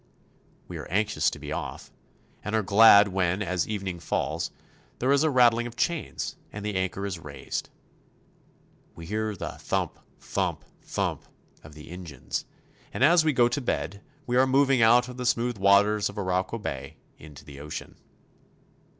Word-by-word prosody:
We - - -7
are - - -7
anxious 105 +5 +1
to - - -8
be - - -8
off, - - -5 0.5
and 105 +2 -2
are 110 - +2
glad 100 +1 +7
when, 95 +1 0
as 90 -2 -1
evening 95 -4 -4
falls, 85 - -2 0.5
there 130 +2 +1
is 140 0 +4
a 160 - +3
rattling 120 -3 +4
of 120 - -10
chains 170 +4 -2
and 105 0 -7
the 105 - -2
anchor 95 +1 -2
is 95 -4 -4
raised. - - -6 1.3
We 85 - -9
hear 110 +3 -2
the - - -6
thump, - - -2 0.2
thump, - - -2 0.2
thump - - -3 0.4
of 75 0 -13
the 75 +1 -12
engines, 85 -8 -5 0.5
and - - -1
as 165 +3 +6
we 155 - +3
go 120 -3 +4
to 130 +4 -2
bed 100 -5 -3 0.2
we 125 -2 0
are 130 +1 +5
moving 135 -1 +3
out 120 +2 +5
of 125 0 -9
the 125 - -4
smooth 115 -1 0
waters 100 +1 +4
of 100 - -11
Arauco 95 +2 -1
Bay 70 - -6 0.2
into 75 -2 -13
the 70 -1 -11
ocean. 75 +1 -7
105 Hz, 165 wpm, -27 LUFS, 90-120 Hz, 1.3 s, glad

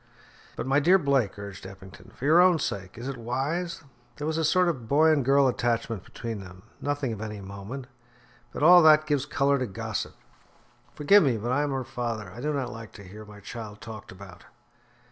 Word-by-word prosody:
"But, - - -4
my 135 +2 +3
dear 175 +6 +5
Blake," 135 - 0
urged 100 -2 -9
Mr. 95 +1 -9
Eppington, 95 0 -15
"for 135 - -7
your 160 +4 +6
own 180 -2 +5
sake, 100 -10 -4
is 120 +3 -6
it 135 -2 -4
wise? 145 +9 -3 0.3
There 145 - -5
was 160 +1 -1
a - - 0
sort 180 +3 +3
of 130 -10 -3
boy 155 +5 +4
and 150 -3 +2
girl 135 +1 +4
attachment 115 -4 -1
between 115 -2 -6
them 95 -1 -12 0.2
nothing 145 -4 -2
of 105 - -8
any 105 -1 -6
moment, 100 +7 -8 0.7
but - - -4
all 175 +2 +9
that 155 -1 +6
gives 145 -2 0
colour 140 -1 +1
to 125 - -2
gossip. 110 +1 -5 0.8
Forgive 195 +8 +5
me, 130 -7 +2
but 115 +3 -3
I 145 +3 +2
am 145 - -1
her 135 -1 -2
father; 115 -6 -5
I 120 +6 -10
do 150 +2 -1
not 135 -4 -2
like 115 -1 -10
to 100 - -12
hear 105 +3 -11
my 105 -1 -13
child 105 0 -8
talked 110 -2 -10
about." 95 -1 -13
125 Hz, 210 wpm, -26 LUFS, 105-145 Hz, 0.8 s, all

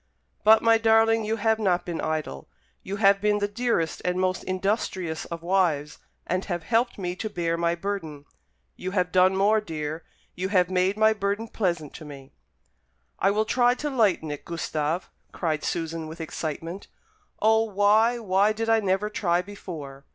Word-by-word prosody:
"But, 220 +1 +6
my 225 0 +5
darling, 225 0 +4
you 220 +1 0
have 220 0 +1
not 180 -4 +1
been 170 -2 -4
idle. 155 - -3 0.3
You 195 - -5
have 200 -1 +4
been 210 0 +2
the 205 0 0
dearest 205 -6 -1
and 180 0 0
most 185 0 0
industrious 185 -3 -2
of 170 -1 -7
wives, 170 -5 0 0.3
and 185 +2 -1
have 175 -4 -3
helped 235 +6 +1
me 180 -2 -3
to 215 - -4
bear 170 -4 -1
my 170 0 0
burden. 170 -6 -5 0.5
You 185 - -5
have 180 0 +1
done 185 +1 +4
more, 210 +3 +3
dear 160 -3 -5 0.3
you 185 +1 -3
have 185 -3 +2
made 185 +2 +1
my 220 0 +5
burden 205 +2 -2
pleasant 170 -9 -2
to 160 - -10
me." 140 -2 -11 0.9
"I 195 - +3
will 215 +2 +1
try 245 +2 +3
to 295 +2 -4
lighten 200 - +1
it, 145 - -6
Gustave," 165 0 -2 0.3
cried 155 -3 -2
Susan, 165 -1 -3
with 160 +2 -9
excitement. 165 +3 -5 0.5
"O, 220 +1 +4
why, 215 +3 +3
why 205 -1 +2
did 225 +1 -3
I 225 0 +5
never 195 0 0
try 180 -4 0
before! 155 -8 -9
185 Hz, 175 wpm, -25 LUFS, 165-215 Hz, 0.9 s, But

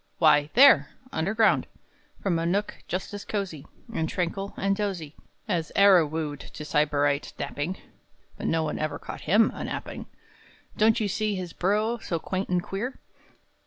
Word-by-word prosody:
Why, 150 -2 +5
there, 275 +4 +7 0.2
Underground, 215 +7 +2 0.6
From 175 -4 +1
a 165 - -1
nook 200 +4 0
just 185 +3 -4
as 205 - -5
cosey, 190 -9 -4 0.3
And 160 -6 -1
tranquil, 195 +2 -3
and 195 0 +1
dozy, 185 -8 -3 0.3
As 170 -6 -1
e'er 200 -4 +7
wooed 150 -2 -3
to 150 - -9
Sybarite 145 -1 +1
napping 165 +6 -3 0.6
(But - - -4
none 160 -2 0
ever 155 -2 -2
caught - - -8
him 210 +8 +4
a - - -6
napping). - - -5 0.7
Don't 220 +2 +4
you 215 - 0
see 210 +1 -1
his 180 -3 -5
burrow 215 +5 +1
so 175 -5 -2
quaint 190 +4 -3
and 180 -1 +1
queer? 235 +7 -4
185 Hz, 155 wpm, -26 LUFS, 160-205 Hz, 0.7 s, there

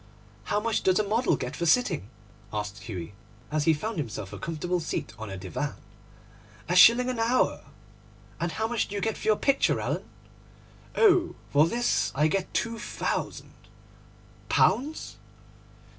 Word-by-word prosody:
'How 205 - +1
much 225 +1 0
does 185 -1 +3
a 215 - +3
model 220 +5 +1
get 125 +2 -5
for 170 - -1
sitting?' 170 - +2 0.4
asked 105 -1 -5
Hughie, 90 -4 -6 0.4
as 150 -1 0
he 160 - +5
found 210 +5 -4
himself 110 -7 -5
a - - -7
comfortable 175 +2 -2
seat 155 - -4
on 110 -1 -6
a 95 - -6
divan. 95 +11 -4 0.9
'A 180 - 0
shilling 235 +7 +7
an 250 -2 -2
hour.' 235 +3 +1 0.8
'And 170 +1 -2
how 220 +1 -1
much 235 -1 -1
do 205 - -7
you 200 - -2
get 220 +1 0
for - - -7
your 215 - +5
picture, 275 +5 +2
Alan?' - - -3 0.9
'Oh, 370 -6 +4 0.2
for 150 +3 +5
this 240 +6 +1
I 150 +3 +3
get 190 +3 -1
two 230 -1 -2
thousand!' - - -3 1.0
'Pounds? 295 +5 +1
180 Hz, 160 wpm, -27 LUFS, 145-230 Hz, 1.0 s, shilling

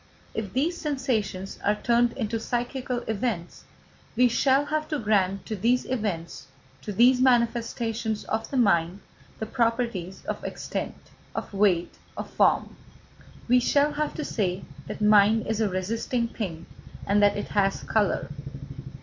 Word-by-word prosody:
If 205 -4 -4
these 325 +7 0
sensations 230 - -2
are 205 - +3
turned 235 +2 +2
into 225 -2 -2
psychical 245 +1 -2
events, 210 -5 -3 0.5
we 250 0 +5
shall 270 +4 +3
have 305 +1 -1
to 305 - -1
grant 195 -4 +1
to 220 - -3
these 235 +6 +2
events, 205 -9 -3 0.3
to 210 - -5
these 250 +5 +5
manifestations 235 -3 +1
of 220 +1 -3
the 275 - -2
mind, 180 -5 +2 0.4
the 220 - -3
properties 230 -6 -1
of - - -4
extent, - - -4 0.4
of - - -5
weight, 195 -4 +2 0.2
of - - -6
form. - - +2 0.7
We 250 +1 +5
shall 285 +4 +3
have 300 0 -2
to 305 - -3
say 190 -3 -1 0.2
that - - -6
mind 210 +1 +5
is 220 0 -1
a 215 - +2
resisting 230 +6 -1
thing, 170 -8 -5 0.4
and 205 +1 +3
that 205 0 +4
it 205 - -4
has 195 -1 +1
colour. 210 -8 0
225 Hz, 145 wpm, -26 LUFS, 200-250 Hz, 0.7 s, we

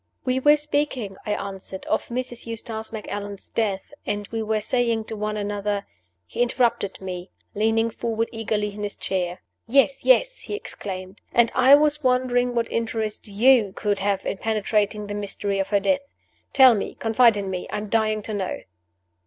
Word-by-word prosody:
"We 255 0 +1
were 295 +3 +6
speaking," 290 -8 -2
I 210 - +1
answered, 195 -1 -6
"of - - 0
Mrs. 240 -1 -5
Eustace 225 -1 -4
Macallan's 205 -2 -6
death, 200 -4 -2
and 205 0 -3
we 225 -1 -2
were 220 0 0
saying 230 0 0
to 220 - -6
one 210 0 -2
another 205 0 -2 0.2
" 90 0 -50
He - - -4
interrupted 240 -5 +1
me, 185 -1 -6 0.2
leaning 225 +2 +1
forward 230 0 -2
eagerly 215 -2 -2
in 210 - -8
his 205 -1 -3
chair. 180 -2 -3 0.2
"Yes! 275 +2 +3
yes!" - - +4
he 415 - -5
exclaimed. 190 - -6
"And 235 -1 +4
I 260 +2 +7
was 300 0 +2
wondering 250 -1 +2
what 230 -1 0
interest 220 -2 -2
you 215 0 +4
could 205 -2 0
have 195 0 0
in - - -2
penetrating 210 0 0
the 205 - -5
mystery 200 -1 -2
of 195 - 0
her 205 - +2
death. 280 +7 +1 0.5
Tell 260 -3 +8
me! 205 - -3
Confide 225 0 +4
in 195 -1 -3
me! 180 -1 -4
I - - -3
am 210 0 -4
dying 215 -1 +1
to 215 - -4
know!" 195 -3 -3
220 Hz, 180 wpm, -24 LUFS, 200-240 Hz, 0.5 s, Tell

